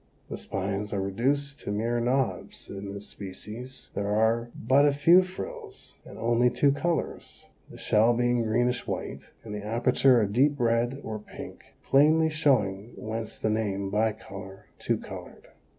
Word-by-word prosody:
The - - -3
spines 100 +2 -3
are 100 - 0
reduced 135 +9 -1
to - - -5
mere 115 +3 0
knobs 125 +2 -1
in 100 0 -6
this 100 +1 -7
species, 110 +7 -9
there 100 - -2
are 110 +3 +2
but 130 +5 +3
a 145 - +5
few 165 +6 +6
frills, 415 - -7
and - - -12
only 120 +1 +3
two 130 +4 +3
colors, 160 +4 -3 0.2
the - - -12
shell 110 +2 +3
being 120 0 +2
greenish 120 +2 0
white - - -4 0.2
and 110 -2 -7
the 105 -1 -5
aperture 120 +3 +3
a 105 - +2
deep 140 +7 +2
red 120 +3 +1
or 110 -1 -4
pink, 105 - -11
plainly 155 +3 +4
showing 115 -9 +1
whence 110 0 -5
the 110 - 0
name, 100 -3 -1
bicolor, 100 -3 -3
two - - 0
colored. - - -10
115 Hz, 155 wpm, -27 LUFS, 105-135 Hz, 0.2 s, few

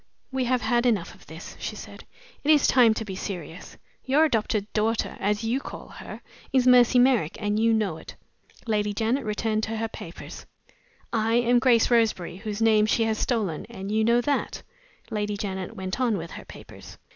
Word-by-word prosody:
"We 260 -1 -1
have 250 0 +1
had 240 +2 +2
enough 205 -8 0
of - - -19
this," 160 +2 -10
she - - -5
said. - - -11 0.4
"It 290 - -2
is 300 -3 +5
time 235 -4 +5
to 220 - -4
be 190 -2 -6
serious. 180 -3 -7 0.3
Your 285 +4 +3
adopted 215 -6 0
daughter 220 +1 0
(as 210 +2 0
you 235 +4 0
call - - -9
her) - - -10 0.3
is 260 -2 +3
Mercy 250 0 +6
Merrick, 245 - +3
and 210 0 -1
you 225 +1 +3
know 210 -7 0
it." - - -11 0.5
Lady 210 -2 0
Janet 235 +5 0
returned 215 0 -1
to 225 0 -4
her 225 +1 -1
papers. 170 -5 -10 0.7
"I 225 0 +1
am 240 0 +3
Grace 245 -2 +3
Roseberry, 220 -7 +1
whose 215 +1 -4
name 215 -1 +4
she 225 - +2
has 220 -1 -1
stolen, 205 -11 -1
and 195 +1 -7
you 220 +1 +2
know 235 +2 +3
that." 285 +3 -2 0.5
Lady 210 -1 -2
Janet 190 -2 -5
went 190 +6 -4
on 235 -5 +2
with 165 -1 -7
her - - -9
papers. - - -13
220 Hz, 190 wpm, -25 LUFS, 205-240 Hz, 0.7 s, Mercy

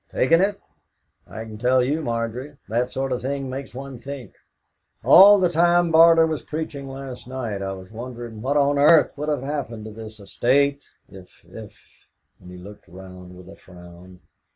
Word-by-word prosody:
"Taken 165 +6 +3
it! 200 +1 0 0.7
I 110 - -8
can 110 -1 -10
tell 125 +2 +2
you, 145 +5 -1
Margery, 120 +3 -4
that 120 +4 -1
sort 135 0 -3
of 125 - -2
thing 135 0 -4
makes 135 -1 -8
one 135 -1 -8
think. 135 -4 -9 0.7
All 200 +3 +8
the 185 - +3
time 175 0 +2
Barter 165 0 +6
was 160 -2 -3
preaching 150 -3 -6
last 135 -2 -9
night 120 -6 -5
I 95 0 -4
was 95 +1 -12
wondering 120 -1 -8
what 140 +4 0
on 145 0 +2
earth 150 +2 +5
would 150 +1 -4
have 145 -4 -2
happened 135 -6 -5
to 110 - -8
this 110 0 -11
estate 140 +8 0 0.3
if 95 -2 -16
if - - -15
" - - -50
And 90 - -15
he 90 - -11
looked 100 +3 -13
round 90 -1 -13
with 90 0 -14
a 100 - -12
frown. 90 0 -16
130 Hz, 180 wpm, -22 LUFS, 105-145 Hz, 0.7 s, All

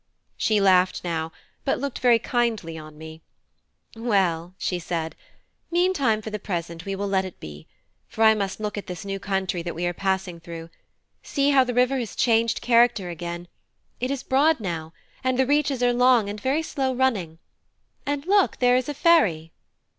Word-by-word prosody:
She 215 -1 +1
laughed 185 -2 +3
now, 165 -2 -2 0.3
but 270 - 0
looked 280 -2 -4
very 245 -2 +5
kindly 230 -8 -1
on 155 -1 -10
me. 160 +1 -10 0.7
"Well," 185 -7 0
she 180 - -2
said, 165 -2 -4 0.5
"meantime 335 -12 +1
for 220 - -6
the 210 - -4
present 170 -4 -5
we 195 0 -3
will 200 +1 -3
let 190 -1 +1
it 185 -2 -9
be; 75 0 -10 0.4
for 225 - -1
I 220 0 +7
must 200 -2 -3
look 210 -1 -3
at 205 - -11
this 180 0 -7
new 195 0 -4
country 190 -3 -2
that 170 0 -5
we 175 +2 -2
are 175 - 0
passing 190 -1 -2
through. 165 0 -9 0.5
See 280 0 +1
how 270 -2 +6
the 245 -1 -4
river 250 +2 +3
has 235 -4 -5
changed 230 -1 +2
character 235 -5 +3
again: 170 +1 -6 0.5
it 255 - -1
is 275 -1 -3
broad 290 +3 +3
now, 165 -6 -4 0.3
and 255 -1 +1
the 265 - +3
reaches 280 -2 +1
are 245 0 +3
long 245 -4 +4
and 205 0 -8
very 280 +7 0
slow 265 -4 -2
running. 210 -11 0 0.7
And 285 0 -3
look, 395 +1 +3
there 245 0 +4
is 255 +2 -2
a 295 - -4
ferry!" 200 - +3
210 Hz, 185 wpm, -24 LUFS, 175-255 Hz, 0.7 s, I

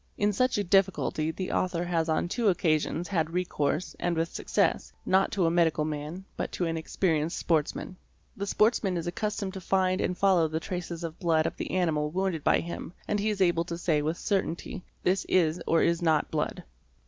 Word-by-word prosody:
In 205 0 +2
such 255 +4 +2
a 205 - +1
difficulty 190 -4 +2
the 185 +3 -4
author 180 -1 0
has 165 -2 0
on 160 +2 +1
two 230 +5 0
occasions 165 -2 +1
had 165 -5 0
recourse, 170 -2 -1
and 175 -1 0
with 165 +1 -1
success, - - 0
not 190 +1 +3
to 190 -4 +2
a 165 - +3
medical 165 -3 +2
man, 155 +5 -5
but - - -3
to 180 - -1
an 165 -1 -1
experienced 160 -1 0
Sportsman. 160 +2 -1 0.4
The 200 0 -4
sportsman 210 -4 +2
is 170 - -3
accustomed 200 +1 -2
to 190 - -6
find 185 0 +1
and 180 - -1
follow 185 -5 +4
the 155 +1 -2
traces 175 -1 -5
'of 165 -1 -6
blood 165 -4 +2
of - - -2
the - - -5
animal 160 -5 +1
wounded 180 -2 -1
by - - +3
him 170 0 -6
and 210 - 0
he 210 +2 +1
is 205 -2 -2
able 175 -2 +3
to 170 -1 -4
say 160 -3 +1
with 155 +3 -1
cer 200 -2 +1
tainty: 170 +1 -6 0.2
"this 185 +1 +2
is 170 -2 +2
or 165 - +3
is 170 0 +2
not 160 -3 +2
blood". - - -2
175 Hz, 205 wpm, -28 LUFS, 160-190 Hz, 0.4 s, follow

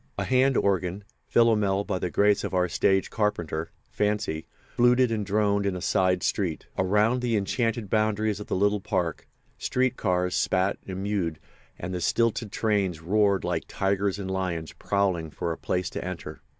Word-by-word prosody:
A - - 0
hand 130 0 +3
organ—Philomel 100 +2 +1
by 100 -3 -2
the 90 - -2
grace 105 +3 +3
of - - -3
our 90 0 +3
stage 95 +2 +1
carpenter, 85 -7 -1 0.2
Fancy—fluted 105 +5 +1
and 110 -2 -1
droned 100 0 +1
in 95 - -1
a - - -4
side 90 0 +1
street. 90 -6 -1
Around 105 +6 +2
the 120 -3 +1
enchanted 115 +2 -1
boundaries 110 0 +1
of 105 - -8
the - - -1
little 100 +1 +2
park 90 -5 -2 0.3
street 130 0 0
cars 90 0 0
spat 95 +1 +1
and 95 0 -4
mewed 95 -6 -1 0.4
and 90 +1 -5
the 90 - -3
stilted 115 +3 +1
trains 100 -7 0
roared 100 +3 +2
like 90 -2 -2
tigers 100 0 0
and 95 -2 -4
lions 90 -4 -3
prowling 95 -5 0
for 85 +2 -3
a - - -2
place 90 -1 -1
to - - -4
enter. 90 -2 -6
100 Hz, 165 wpm, -26 LUFS, 90-105 Hz, 0.4 s, hand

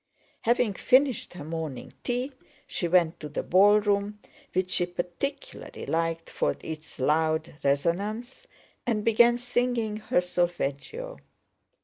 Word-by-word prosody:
Having 235 -2 +2
finished 255 +1 +2
her 160 - -7
morning 160 -3 -5
tea 250 +3 -1 0.3
she 175 - -2
went 170 -1 +3
to 150 - -6
the 150 - -3
ballroom, 205 +2 +4 0.3
which 185 0 0
she 175 - +1
particularly 180 - -5
liked 165 0 -1
for - - 0
its 155 -1 -7
loud 155 +3 +1
resonance, 200 - -1 0.4
and 215 -3 0
began 235 +1 +5
singing 245 -3 0
her 215 -4 +1
solfeggio. 180 - -2
190 Hz, 115 wpm, -27 LUFS, 165-240 Hz, 0.4 s, began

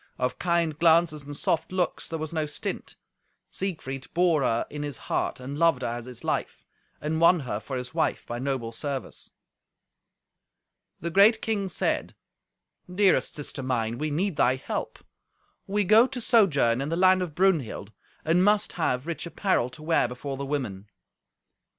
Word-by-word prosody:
Of 125 0 -2
kind 170 -3 0
glances 165 -2 +4
and 145 0 -7
soft 165 +1 -1
looks 185 -2 -2
there 165 - -3
was 155 0 -5
no 155 -2 -1
stint. 150 - -5 0.6
Siegfried 135 -8 -4
bore 170 -4 +3
her 120 -3 +1
in 150 - -7
his 145 -3 -4
heart, - - -2
and 135 +3 -6
loved 165 -6 +3
her - - -1
as 120 0 -5
his 125 -2 -10
life, - - -3 0.3
and 160 +2 -2
won 170 0 +6
her 115 -6 -3
for 130 +4 -5
his 125 0 -6
wife - - 0
by 120 0 -5
noble 130 -3 -2
service. 135 +3 -5 1.7
The 170 +2 -3
great 205 +5 +6
king 205 -4 -2
said, - - -1 0.8
"Dearest 195 +1 +2
sister 145 -2 -4
mine, 120 -3 -1
we 155 - -1
need 170 +2 -1
thy 125 +1 +3
help. 130 - -4 0.7
We 205 +1 +1
go 220 +6 +6
to 265 -1 -5
sojourn 145 - +3
in 140 - -3
the 165 - 0
land 185 0 +5
of 170 -5 -4
Brunhild, 160 - +1 0.3
and 170 +3 +3
must 210 +1 +2
have 130 -6 -1
rich 170 0 -4
apparel 170 - 0
to 130 +5 -12
wear 160 -5 +2
before 130 +3 -6
the 140 +1 -5
women." 110 -9 -4
155 Hz, 170 wpm, -26 LUFS, 130-180 Hz, 1.7 s, won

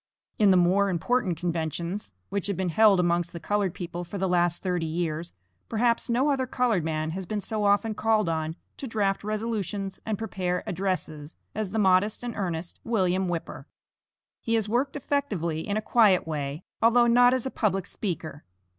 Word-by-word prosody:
In 210 -2 +6
the 185 - +6
more 190 +3 +3
important 180 0 0
conventions 170 +3 -3
which 200 0 -2
have 200 -4 -2
been 185 -2 0
held 205 +2 +5
amongst 175 -1 +1
the 170 - -6
colored 200 -1 -1
people 175 0 -5
for 175 +4 -7
the 190 0 0
last 175 -1 +1
thirty 180 -3 -1
years, 165 0 -2 0.4
perhaps 230 +2 +1
no 260 +5 +2
other 260 -2 0
colored 240 -8 +1
man 155 0 -2
has 185 +1 -5
been 210 +2 -2
so 210 +1 -2
often 205 +2 +3
called 215 -2 +2
on 160 -1 -1 0.2
to 270 - -6
draft 205 -4 0
resolutions 210 -2 -3
and 220 -2 -2
prepare 185 -5 -2
addresses, 170 -5 -3 0.2
as 215 -2 -2
the 220 - -3
modest 200 +2 +3
and 240 -2 -4
earnest 175 -3 -4
William 190 -4 +1
Whipper. 170 -2 -5 0.7
He 230 - 0
has 220 -2 0
worked 255 +6 0
effectively 205 - -2
in 205 0 0
a 215 - -2
quiet 215 -7 +4
way, 145 +1 -3 0.2
although 240 +1 +5
not 245 +1 +5
as 255 - -2
a 265 - -2
public 195 -4 0
speaker. 160 -8 -5
195 Hz, 180 wpm, -27 LUFS, 175-220 Hz, 0.7 s, In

